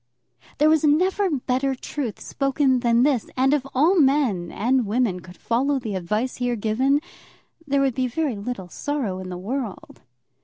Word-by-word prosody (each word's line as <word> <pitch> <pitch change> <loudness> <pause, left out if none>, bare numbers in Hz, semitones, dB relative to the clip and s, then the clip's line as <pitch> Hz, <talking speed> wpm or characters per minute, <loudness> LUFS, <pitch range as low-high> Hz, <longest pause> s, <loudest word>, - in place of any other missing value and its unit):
There 300 - +4
was 315 -1 +4
never 370 +6 +2
better 265 -2 -1
truth 255 -3 -5
spoken 275 -2 +1
than 235 0 +3
this, 270 -5 +1
and 265 +2 +3
if 295 -3 +1
all 335 +8 +4
men 265 - +2
and 245 +2 +1
women 215 -4 0
could 180 0 -14
follow 270 +5 0
the 230 -5 -4
advice 210 +7 -2
here 245 -1 -1
given, 255 +7 +1 0.7
there 280 0 +2
would 270 -2 +2
be 255 +1 0
very 275 0 -1
little 200 -2 -5
sorrow 230 -3 -3
in 185 -1 -7
the 180 - -5
world. 220 +2 -5
255 Hz, 165 wpm, -23 LUFS, 220-280 Hz, 0.7 s, There